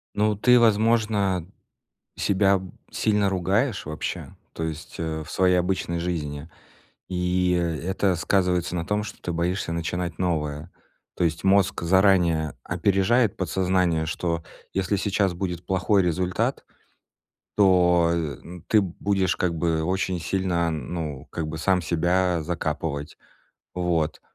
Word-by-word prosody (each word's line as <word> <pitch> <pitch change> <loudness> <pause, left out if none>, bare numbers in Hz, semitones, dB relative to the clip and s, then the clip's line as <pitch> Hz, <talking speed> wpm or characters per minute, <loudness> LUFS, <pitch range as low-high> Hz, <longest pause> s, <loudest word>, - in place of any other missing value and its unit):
Ну, 105 0 +2
ты, 125 +4 +5
возможно, 110 -5 +2 0.7
себя 100 -1 +2 0.3
сильно 105 -2 +1
ругаешь 95 +5 0
вообще, 75 0 -5 0.2
то 80 - -4
есть, 80 0 -6
э, 80 -1 -3
в 75 - -12
своей 90 -1 +3
обычной 90 -1 -1
жизни, 80 -3 -4 0.6
и, 90 0 +1
э, - - +1 0.3
это 95 -1 +1
сказывается 90 -1 +1
на 85 -1 -2
том, 105 +3 -1
что 110 - -9
ты 90 - -3
боишься 85 +1 -1
начинать 85 0 -3
новое, 80 -3 -2 0.5
то - - -2
есть 85 0 -1
мозг 95 -2 +3
заранее 85 -4 +3
опережает 100 +5 +2
подсознание, 90 -2 +1
что 85 +1 -2 0.3
если 95 +1 0
сейчас 100 -1 +1
будет 90 -1 -4
плохой 95 +2 +2
результат, 90 +1 -1 0.9
то, 90 -4 +4
э, 80 -4 -2 0.3
ты 110 - +5
будешь 95 +1 0
как 90 -2 0
бы 80 -1 0
очень 95 0 -1
сильно, 85 0 0
ну, 75 -1 -5
как 80 -2 -4
бы 80 - -5
сам 90 +2 +2
себя 85 +2 +1
закапывать. 80 -3 -3 0.6
Вот. 85 -3 -1
90 Hz, 130 wpm, -25 LUFS, 85-95 Hz, 0.9 s, ты